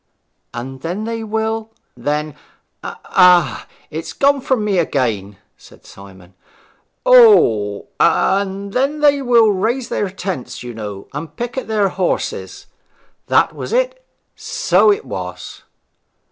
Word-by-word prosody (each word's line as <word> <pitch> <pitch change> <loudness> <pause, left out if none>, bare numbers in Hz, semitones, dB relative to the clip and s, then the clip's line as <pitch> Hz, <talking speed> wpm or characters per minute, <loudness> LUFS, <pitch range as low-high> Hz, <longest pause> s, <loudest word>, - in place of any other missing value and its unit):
'And 130 +2 -7
then 180 +7 -4
they 225 0 -4
will 220 0 -2
' - - -48
'Then 150 +1 -2 0.5
Ah, 175 -10 +2 0.2
it's 160 +1 -6
gone 280 0 +2
from 250 -5 0
me 200 -3 +1
again!' 110 - -1 0.2
said - - -19
Simon. 95 -2 -15 0.7
'O, 265 - +5
and 195 0 +1
then 280 +4 0
they 285 -1 +4
will 235 -4 +4
raise 235 +6 -1
their 205 - -1
tents, 185 -11 -6
you 120 -1 -7
know, 105 -3 -7
and 150 +2 -7
picket 245 +2 -4
their 210 -3 +1
horses. 185 -1 -3 0.6
That - - +3
was - - -7
it; - - 0 0.3
so 420 - +2
it 415 +2 -2
was.' - - -7
195 Hz, 125 wpm, -18 LUFS, -, 0.7 s, O